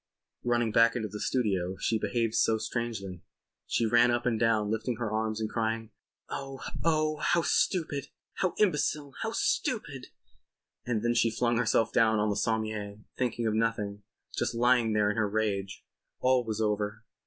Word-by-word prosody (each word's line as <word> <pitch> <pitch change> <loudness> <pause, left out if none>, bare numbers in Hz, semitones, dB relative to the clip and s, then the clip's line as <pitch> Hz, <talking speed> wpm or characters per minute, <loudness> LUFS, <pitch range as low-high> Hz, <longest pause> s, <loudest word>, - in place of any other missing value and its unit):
Running 120 -2 +1
back 115 +2 +5
into 110 -3 -2
the 105 +2 -7
studio 95 -8 0
she 110 - 0
behaved 110 +2 0
so 110 -1 +3
strangely. 110 -6 -4 0.5
She 115 - +1
ran 120 +2 +5
up 120 0 0
and 115 -3 +1
down 110 -2 +2
lifting 110 +2 -1
her 110 -2 -3
arms 110 0 -1
and 110 - -1
crying: 110 0 -2 0.4
"Oh! 135 -1 -6 0.2
Oh! 155 -2 +2
How 170 +2 +2
stupid! 150 -8 0 0.3
How 185 -3 0
imbecile! 150 -7 +1
How - - -1
stupid!" - - -1 0.8
And 115 -3 0
then 120 0 +2
she 115 -1 +3
flung 120 +1 0
herself 115 -1 +2
down 110 -2 +4
on 105 0 +1
the - - -1
sommier 110 -2 -2 0.2
thinking 120 -2 -1
of 110 - +1
nothing—just 105 -1 -3
lying 120 -1 +3
there 105 -1 +3
in 105 - -5
her 110 -2 +1
rage. 100 -2 -2 0.3
All 130 -1 +3
was 110 -2 -4
over. 105 +1 -1
115 Hz, 165 wpm, -29 LUFS, 105-120 Hz, 0.8 s, back